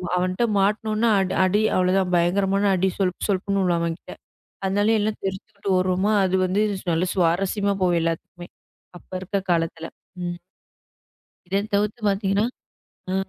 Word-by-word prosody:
அவன் 180 0 +1
கிட்ட 235 +6 +1
மாட்டுனோனா 215 +3 +1 0.4
அடி 200 +3 +2
அவ்வளவுதான். 185 0 +2
பயங்கரமான 195 +3 +2
அடி. 190 +1 +1
சொல்ப் 185 -2 -1
சொல்ப்னு 200 0 0
உழுகும் 175 -2 +1
அவன் 170 -1 -2
கிட்ட. - - -11 0.5
அதனால 205 +3 +2
எல்லாம் 210 +1 -1
தெறிச்சுக்கிட்டு 195 +1 -5
ஓடுவோமா, 185 +3 +1
அது 185 0 0
வந்து 190 +3 +1 0.3
நல்ல 165 +1 +1
சுவாரஸ்யமா 195 +3 +1
போகும் 175 -2 +3
எல்லாத்துக்குமே. 165 +1 -4 0.5
அப்ப - - -29
இருக்க 195 +2 -2
காலத்துல. 165 -1 -1 0.4
ம். 175 0 -4 1.1
இதத் 200 +3 -2
தவிர்த்து 210 +3 0
பாத்தீங்கன்னா 195 +1 +1 0.7
ஆ. - - 0
190 Hz, 135 wpm, -23 LUFS, 180-200 Hz, 1.1 s, போகும்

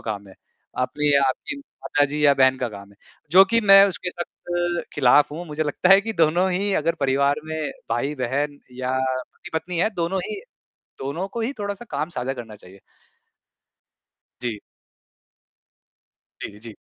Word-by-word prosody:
काम 100 -1 -5
है, 95 - -14 0.4
आपने 150 +4 -1
या 140 - +5
आपकी 290 - -4
माता 210 - -1
जी 150 +1 -2
या 145 - +7
बहन 130 -1 +4
का 125 - -1
काम 100 -2 -11
है। 100 - -21 0.3
जो 190 +4 +8
कि 230 - +5
मैं 195 -1 +8
उसके 180 -1 -4
सख़्त 175 0 -3
खिलाफ़ 145 +1 +5
हूँ, 170 +3 -6
मुझे 150 0 -2
लगता 155 +4 0
है 195 +1 +8
कि 225 +2 -4
दोनों 175 +4 +3
ही 200 +3 0
अगर 165 +1 +1
परिवार 140 +2 +2
में 155 -1 -3 0.2
भाई-बहन 140 +3 -1 0.2
या 130 0 -1
पति-पत्नी 160 +6 -4
है 215 - +2
दोनों 175 +2 -1
ही 420 -2 -5 0.6
दोनों 140 +8 -3
को 230 +4 -5
ही 245 +5 -2
थोड़ा-सा 205 +3 -4
काम 155 - -2
साझा 130 -4 -3
करना 115 -4 -9
चाहिए। 95 -1 -16 1.6
जी। 115 -3 -3 1.8
जी, 105 - -7
जी। 110 0 -10
150 Hz, 160 wpm, -23 LUFS, 130-180 Hz, 1.8 s, जो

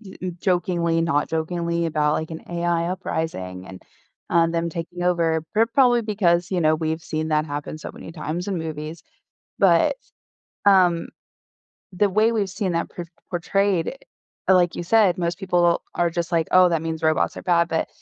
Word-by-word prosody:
e 185 -3 -7
jokingly, 175 -3 +1
not 150 -3 +1
jokingly 170 +1 -1
about, 150 -1 +1
like, 160 +1 -3
an 160 - -7
AI 170 0 0
uprising, 160 - -4
and, 95 -1 -10 0.5
um, 165 -1 +3
them 170 0 -1
taking 170 +2 -6
over, 165 -3 +1
pro 225 +2 +4
probably 245 0 +4
because, 180 -5 +1
you 185 -2 0
know, 155 0 +4
we've 160 +1 -2
seen 155 0 -3
that 155 0 +1
happen 145 +1 -5
so - - -7
many - - -10
times 165 +3 -4
in 190 -4 -1
movies. 155 0 -6 0.6
But, - - +4 0.7
um, 180 -4 +4 0.8
the 200 +2 +1
way 215 +4 +3
we've 210 -4 0
seen 185 -1 -2
that 170 - -2
por 175 -1 -7 0.2
portrayed, 190 +3 0 0.5
uh, 190 - +7
like 175 -2 +3
you - - -3
said, 195 0 +3
most 170 0 -2
people 175 -3 +2
are 175 -1 +1
just 170 +1 -3
like, 165 -2 +1
"Oh, 185 0 +7
that 165 -2 0
means 160 0 -4
robots 155 -3 +1
are - - -7
bad," 170 -1 +2
but, 160 - -1
170 Hz, 175 wpm, -23 LUFS, 160-185 Hz, 0.8 s, uh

